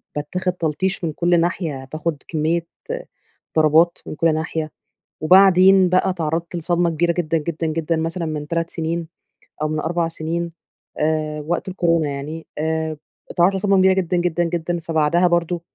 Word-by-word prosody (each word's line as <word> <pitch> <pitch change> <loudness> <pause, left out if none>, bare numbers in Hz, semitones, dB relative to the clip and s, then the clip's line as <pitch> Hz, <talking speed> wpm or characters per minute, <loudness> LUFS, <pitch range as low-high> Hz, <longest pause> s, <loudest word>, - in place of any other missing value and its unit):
باتّاخد 180 +5 -2
تلطيش 180 +3 -2
من 160 - -1
كل 175 +2 +2
ناحية، 160 -6 -2
باخد 155 -2 -3
كمّية 165 +1 -1 0.9
ضربات 160 +2 +4
من - - -5
كل 165 0 +2
ناحية، 155 -1 -3 0.5
وبعدين 185 +1 +6
بقى 185 +1 +3
اتعرّضت 165 -1 -2
لصدمة 175 +1 +1
كبيرة 170 +2 +1
جدًا، 165 -1 0
جدًا، 160 +1 -3
جدًا 160 +1 -1
مثلًا 165 +2 -2
من 150 -2 -4
3 165 +1 -1
سنين، 165 0 -3 0.5
أو 155 - +1
من 155 0 -2
4 170 +2 0
سنين، 165 +1 -3 0.5
آآ 155 0 -1
وقت 175 +3 -1
الكورونا 170 -5 +1
يعني 150 +4 -6
آمم 160 0 -1 0.3
إتعرّضت 180 +3 +3
لصدمة 195 0 +2
كبيرة 190 0 +5
جدًا، 180 -1 0
جدًا، 175 0 +1
جدًا. 170 0 -2
فبعدها 165 +2 +2
برضه 170 0 0
165 Hz, 150 wpm, -21 LUFS, 155-175 Hz, 0.9 s, وبعدين